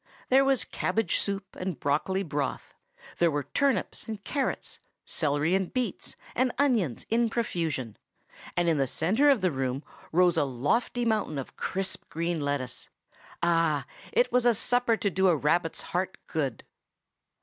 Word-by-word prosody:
There 265 +1 +6
was 270 -2 +3
cabbage 225 - 0
soup 195 -1 -2
and 185 -3 -4
broccoli 170 +7 0
broth. 145 -4 -3 0.5
There 170 - +5
were 145 -2 -1
turnips 245 - 0
and 220 -2 -5
carrots, 275 +8 -2 0.3
celery 150 +2 +1
and 190 -1 +1
beets 255 -2 -3 0.2
and 255 -1 +2
onions, 230 - +1
in 230 0 +3
profusion; 165 - -2 0.6
and 175 0 +2
in 160 -3 +3
the 135 - +2
centre 210 - +3
of 270 -7 +4
the 185 -2 +2
room 135 0 -2 0.3
rose 175 +1 +4
a - - +4
lofty 145 - 0
mountain 215 -9 0
of 135 - -6
crisp 190 0 -3
green 170 +1 -1
lettuce. 140 -3 -3 0.5
Ah! 165 -4 +2 0.3
that 485 +2 +3
was 250 -1 +3
a 235 - +5
supper 245 +1 +3
to 200 - 0
do 190 +1 +3
a 175 - +5
rabbit's 165 +3 +1
heart 185 +2 -2
good! 140 -7 -2
180 Hz, 155 wpm, -28 LUFS, 150-230 Hz, 0.6 s, There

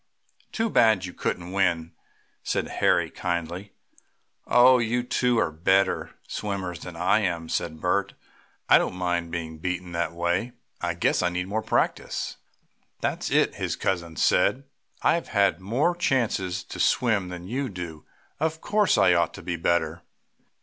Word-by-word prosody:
"Too 225 0 0
bad 110 - +4
you 90 - -7
couldn't 90 0 -3
win," 85 -4 0 0.5
said - - -1
Harry - - +1
kindly. 85 +3 -4 0.7
"Oh, 125 +1 +6
you 120 +1 0
two 125 -1 +1
are 80 - +1
better 95 +5 +1
swimmers 95 -5 -4
than 90 0 -9
I 90 +5 +3
am," 85 -5 -2
said 80 -1 -3
Bert. 95 +4 0 0.5
"I - - +7
don't - - -2
mind 90 -2 -1
being 80 -2 -5
beaten 90 0 -3
that 85 -1 -1
way. 85 +8 -1 0.3
I 85 -1 -1
guess 85 - +1
I 90 - +2
need 90 +1 -3
more 110 +2 -1
practice." 110 - -1 0.6
"That's - - -1
it," - - +3
his - - -2
cousin 85 -3 -2
said. 130 +12 +2 0.4
"I - - +5
have 170 - -2
had 100 -4 +2
more 130 - +1
chances 115 - 0
to - - -9
swim 105 -7 +2
than 90 -1 -7
you 130 +6 -2
do, 85 -5 -8 0.3
so 155 - +1
of 160 0 -7
course 210 +2 +2
I 90 - +5
ought 85 -1 +1
to - - -10
be 85 - -2
better." 85 -1 0
90 Hz, 160 wpm, -26 LUFS, 85-110 Hz, 0.7 s, I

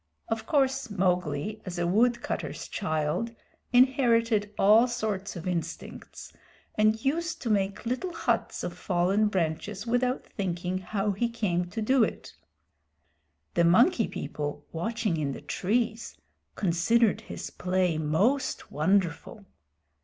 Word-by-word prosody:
Of 225 0 -2
course 270 -3 +1
Mowgli, 180 -1 -1
as 180 -1 -6
a 175 - 0
woodcutter's 235 +7 0
child, 160 +6 -2 0.4
inherited 235 -4 +3
all 215 +5 +6
sorts 215 -5 -3
of 175 +1 -6
instincts, 170 -2 -5 0.4
and 215 +2 +2
used 330 +4 0
to 230 - 0
make 200 +1 0
little 255 +10 -2
huts 330 - -1
of - - -3
fallen 190 +4 +1
branches 190 +2 -2
without 250 +2 0
thinking 180 -1 -3
how 200 +2 -1
he 235 +5 -1
came 195 -7 -1
to 220 +4 -3
do 260 +2 +4
it. - - -4 1.2
The 170 - +3
Monkey 225 - +4
People, 145 0 -5
watching 215 +2 -1
in 145 -3 -1
the - - -8
trees, 220 +8 -1 0.4
considered 200 +5 +2
his - - -7
play 180 -3 0
most 210 - 0
wonderful. 190 +5 0
205 Hz, 125 wpm, -28 LUFS, 175-235 Hz, 1.2 s, all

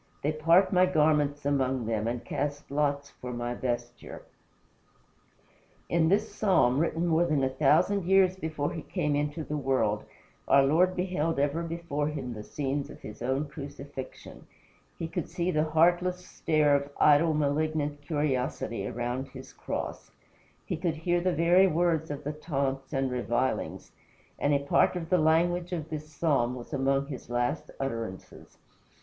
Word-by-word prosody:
They 150 - +2
part 165 +6 +4
my 185 0 +5
garments 150 -4 +2
among 130 -3 +1
them 110 -1 -1
And 120 0 -3
cast 145 -1 -3
lots 140 -1 0
for 125 - -8
my 120 0 -3
vesture." 120 -1 -5 1.7
In 165 -1 +3
this 210 +2 +1
Psalm, 180 - +3
written 165 +1 0
more 170 0 +3
than 150 -5 +1
a 130 - +2
thousand 165 +8 +2
years 190 0 +4
before 155 -5 -3
he 160 - -5
came 150 0 -1
into 150 +2 -2
the 150 0 -3
world, 130 -7 0 0.4
our 140 0 +6
Lord 175 +7 +3
beheld 180 -4 -1
ever 145 +4 +1
before 165 -3 -3
him 135 -5 -4
the 105 - -7
scenes 140 +4 -3
of - - -11
his 105 +1 -10
own 130 +4 -1
crucifixion; 140 -2 -9 0.5
he 165 - -3
could 165 - -4
see 175 +1 -1
the 155 -1 +1
heartless 175 +3 +2
stare 150 -4 +2
of 140 0 -1
idle, 150 +2 +5
malignant 150 0 0
curiosity 135 -8 -2
around 120 +3 -3
his 130 -1 -11
cross; - - -5 0.6
he - - -3
could 170 -3 -1
hear 175 +2 0
the 185 +1 +1
very 175 +4 +5
words 165 -2 +1
of 145 0 -5
the 150 +1 -3
taunts 135 -3 -3
and 135 -2 0
revilings, 125 +1 -2 0.5
and 145 - +1
a 145 - +4
part 140 +5 +2
of 165 -1 -5
the 180 - +4
language 170 +3 +2
of 160 -3 -4
this 155 0 -6
Psalm 140 -6 +1
was 120 -1 -9
among 135 +1 +1
his 135 -4 -8
last 120 0 -1
utterances. 115 -8 -6
150 Hz, 160 wpm, -28 LUFS, 135-165 Hz, 1.7 s, our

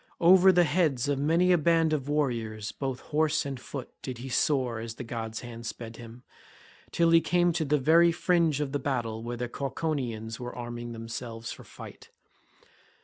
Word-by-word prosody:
Over 185 +2 +7
the 180 -1 +5
heads 150 -5 +1
of 145 -1 0
many 165 +5 +3
a 175 - +4
band 165 0 +3
of 145 -2 -2
warriors 115 -8 -1
both 135 -2 -4
horse 155 0 0
and 135 -2 -5
foot 130 +1 -7
did 130 -2 -5
he 130 +3 -7
soar 130 -3 +1
as 115 0 -6
the 125 - -6
god's 115 -1 -5
hand 115 -1 -8
sped 115 -1 -7
him, 120 +1 -11 0.7
till 170 -1 +2
he 165 0 +6
came 175 0 +2
to 160 -1 -1
the 150 +1 +2
very 165 +5 +5
fringe 165 -4 +1
of 140 -2 -2
the 145 - -1
battle 115 -6 -2
where 120 +1 -5
the 120 +1 -3
Cauconians 125 -5 -3
were 125 0 -6
arming 120 -1 -6
themselves 115 0 -6
for - - -9
fight. - - -12
135 Hz, 185 wpm, -28 LUFS, 120-160 Hz, 0.7 s, Over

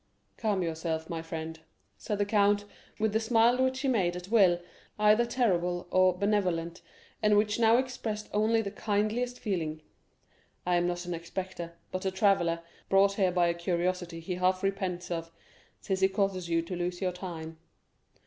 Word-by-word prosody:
30197m - - -42
"Calm 205 -5 0
yourself, 160 -1 -3
my 165 -1 -3
friend," 160 0 -6 0.4
said 210 - -3
the 205 - +1
count, 205 0 +3 0.3
with 215 -1 0
the 220 - +3
smile 230 +2 +3
which 260 0 0
he 275 - 0
made 190 -9 +1
at 180 +1 -7
will 190 -6 +5 0.4
either 215 +3 +4
terrible 180 -8 0
or 185 -1 +4
benevolent, 180 -5 0 0.4
and 210 -1 +4
which 210 +1 +2
now 230 0 +5
expressed 235 -5 -3
only 220 +2 +2
the 200 - -4
kindliest 215 +4 -1
feeling; 160 -7 -3 0.8
"I 180 0 +2
am 175 0 +1
not 175 0 -3
an 175 - -3
inspector, 170 0 -5 0.2
but 185 - -3
a - - +3
traveller, 190 -4 +2 0.3
brought 195 +1 +5
here 190 -3 +2
by 175 -1 +3
a 170 - +2
curiosity 175 0 -2
he 180 +3 -4
half 185 +1 +1
repents 190 -3 -2
of, 165 -1 -3 0.5
since 190 -1 -1
he 190 - +5
causes 190 -3 -1
you 165 0 +2
to 180 +2 -5
lose 175 0 -3
your 185 -2 0
time." 165 -3 -7
185 Hz, 175 wpm, -29 LUFS, 175-210 Hz, 0.8 s, will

